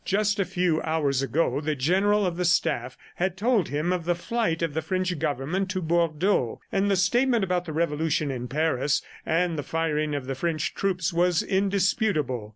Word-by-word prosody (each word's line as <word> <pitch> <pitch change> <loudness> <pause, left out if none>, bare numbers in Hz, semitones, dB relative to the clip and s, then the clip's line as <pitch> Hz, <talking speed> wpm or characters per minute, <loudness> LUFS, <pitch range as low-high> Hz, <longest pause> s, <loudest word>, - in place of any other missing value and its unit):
Just 205 +1 +1
a 195 - +2
few 175 -2 0
hours 145 -4 0
ago, 140 +2 0
the 155 0 -1
General 195 +9 +2
of 175 -2 -1
the 180 - -1
Staff 130 -8 +1 0.2
had 185 +1 -1
told 215 -4 +2
him 155 +5 0
of 175 -3 -3
the 175 0 +1
flight 175 -3 -1
of 165 -3 -1
the 160 - -1
French 185 0 -2
Government 155 +6 -1
to 190 0 -1
Bordeaux, 170 - +1
and 195 +1 +1
the 200 - +3
statement 235 +5 +2
about 180 -1 0
the 160 - -5
revolution 155 -2 0
in 125 -1 -4
Paris 145 0 0 0.2
and 165 -1 +1
the - - 0
firing 155 0 -1
of 140 -3 -4
the 135 - -3
French 155 +2 -2
troops 185 -2 -1
was 175 0 +2
indisputable. 190 - 0
170 Hz, 185 wpm, -26 LUFS, 150-190 Hz, 0.2 s, the